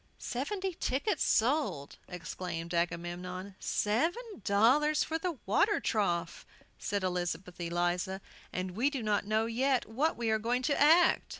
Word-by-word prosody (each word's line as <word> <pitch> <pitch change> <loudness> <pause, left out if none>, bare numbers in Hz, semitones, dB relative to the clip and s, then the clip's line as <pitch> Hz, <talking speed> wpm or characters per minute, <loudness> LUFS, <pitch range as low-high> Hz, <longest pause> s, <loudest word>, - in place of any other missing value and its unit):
"Seventy 375 +9 -3
tickets 315 +5 -1
sold!" 240 - +1
exclaimed 170 -1 -5
Agamemnon. 175 +3 -3
"Seven 335 - -1
dollars 260 +11 +4
for 320 0 -2
the 340 -3 -3
water 405 - +3
trough!" 175 -6 -1 0.4
said 200 -1 -2
Elizabeth 180 0 -3
Eliza. 175 +2 -1 0.3
"And 185 0 -3
we 235 +10 +1
do 275 -5 -4
not 205 -1 0
know 215 +1 +2
yet 255 +3 +1
what 270 +9 0
we 230 -2 0
are 220 - +2
going 245 +3 0
to 285 +1 +1
act!" 325 +4 +5
220 Hz, 135 wpm, -31 LUFS, 180-285 Hz, 0.4 s, act